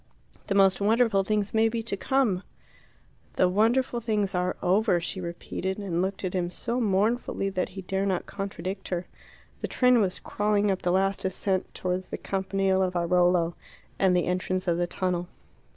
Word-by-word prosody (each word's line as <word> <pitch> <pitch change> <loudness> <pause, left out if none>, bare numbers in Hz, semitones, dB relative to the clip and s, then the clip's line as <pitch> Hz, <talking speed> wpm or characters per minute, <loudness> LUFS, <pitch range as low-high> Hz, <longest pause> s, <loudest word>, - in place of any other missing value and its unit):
The 195 - 0
most 195 -1 +4
wonderful 220 -1 +3
things 210 0 -1
may 225 0 +4
be 225 0 -3
to 225 - -1
come 230 -4 +1 0.5
" - - -33
"The 185 - +4
wonderful 235 +6 +2
things 210 -4 0
are 180 0 0
over," 190 0 +3
she 180 +2 -4
repeated, 180 +2 -4
and 185 -4 -2
looked 190 +1 -2
at 185 - -2
him 180 -2 0
so 235 +7 -2
mournfully 210 0 +1
that 185 -1 -1
he 190 +1 -8
dare 195 +2 -1
not 185 -2 -1
contradict 195 -1 -5
her. 180 -1 -2 0.6
The - - -2
train 250 -2 +4
was 185 -3 0
crawling 205 0 +1
up 190 - -2
the 175 - +1
last 195 +1 +1
ascent 190 0 -1
towards 185 0 -2
the - - -4
Campanile 195 0 0
of 185 -1 0
Airolo 175 0 +2 0.5
and 185 -2 +4
the 175 - +1
entrance 185 +1 -1
of 170 0 +1
the 175 - +1
tunnel. 180 -1 -2
190 Hz, 180 wpm, -27 LUFS, 180-210 Hz, 0.6 s, most